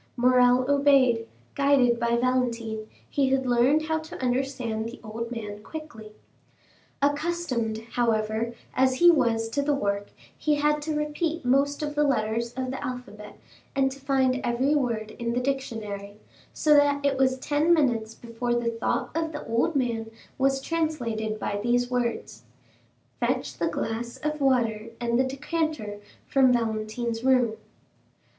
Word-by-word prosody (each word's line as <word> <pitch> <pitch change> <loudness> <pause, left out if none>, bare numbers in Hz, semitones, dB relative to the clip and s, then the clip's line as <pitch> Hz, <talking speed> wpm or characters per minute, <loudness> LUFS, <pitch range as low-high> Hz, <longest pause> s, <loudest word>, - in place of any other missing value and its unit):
Morrel 250 0 +4
obeyed; 275 -5 +4 0.3
guided 270 -4 +3
by 235 0 +1
Valentine, 235 -3 -1 0.2
he 275 -2 +1
had 265 0 +1
learned 250 +5 +3
how 320 0 0
to 315 0 -9
understand 250 -3 -1
the 235 - -9
old 230 +1 -5
man 210 -3 -6
quickly. 225 -8 -9 0.9
Accustomed, 285 -7 0
however, 225 0 0 0.2
as 260 0 +3
he 345 +5 +7
was 230 -7 +1
to 285 +5 0
the 285 0 +1
work, 200 -5 -1 0.3
he 300 -1 +1
had 300 +1 +1
to 310 +1 -2
repeat 300 +1 -2
most 280 +4 +2
of 295 0 -2
the 295 0 +2
letters 235 -3 0
of 255 0 -3
the 265 - -5
alphabet 230 -5 -7 0.4
and 270 -1 +2
to 275 - -9
find 265 -2 +1
every 250 +4 +1
word 230 -7 -1
in 235 0 -1
the 245 - +1
dictionary, 220 -7 -4 0.3
so 300 - +3
that 285 -1 +4
it 280 -1 +2
was 260 -1 +3
ten 295 +5 +1
minutes 235 -9 +2
before 240 +1 -3
the 235 -1 0
thought 230 0 -2
of 325 -1 -1
the 295 - -6
old 235 +8 0
man 230 -4 -1 0.3
was 270 0 +2
translated 240 -10 -2
by 205 -1 -2
these 245 +2 +1
words, 245 -1 -2 0.8
"Fetch - - -1
the - - +1
glass 235 +2 -3
of 300 +2 -3
water 230 -5 +1
and 235 0 0
the - - +5
decanter 275 -5 -3 0.3
from 265 -2 +4
Valentine's 225 0 -1
room." 250 -4 +3
250 Hz, 150 wpm, -26 LUFS, 230-280 Hz, 0.9 s, he